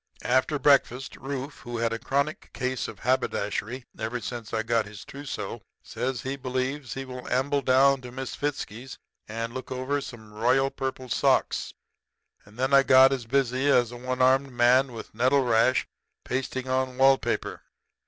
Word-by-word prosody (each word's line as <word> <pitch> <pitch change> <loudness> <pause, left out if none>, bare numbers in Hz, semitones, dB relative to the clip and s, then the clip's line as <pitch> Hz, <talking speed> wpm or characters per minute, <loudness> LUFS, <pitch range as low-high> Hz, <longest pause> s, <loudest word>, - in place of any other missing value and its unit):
"After 130 +4 +2
breakfast 135 -2 +2
Rufe, 135 +1 -5
who 120 0 -6
had 115 0 0
a 115 - -3
chronic 140 +5 -2
case 130 0 -2
of - - -10
haberdashery 125 -1 -1
ever 115 +3 -2
since 120 -2 -6
I 110 -1 -1
got 115 -2 +1
his 105 -1 -11
trousseau, 140 0 -6 0.2
says 130 -1 -3
he 135 +1 -3
believes 130 +1 -3
he 135 0 -5
will 125 -1 -8
amble 140 +2 +1
down 135 +1 +4
to 125 -1 -9
Misfitzky's 130 -2 -5 0.3
and 115 +2 -4
look 130 0 -7
over 130 +3 -1
some 110 -5 -10
royal 130 +5 +2
purple 130 -1 -4
socks. - - +1 0.7
And 105 +2 -18
then 130 +2 0
I 140 - +8
got 135 0 +6
as 125 -4 -4
busy 130 +1 +1
as 120 -4 +4
a 120 - -8
one 125 +1 -1
armed 135 +1 +3
man 125 +2 +4
with 115 - -9
the 110 - -21
nettle 130 +3 +4
rash 120 +1 +3 0.4
pasting 130 0 -3
on 130 0 -1
wall 135 0 +6
paper. - - -3
130 Hz, 170 wpm, -26 LUFS, 120-135 Hz, 0.7 s, I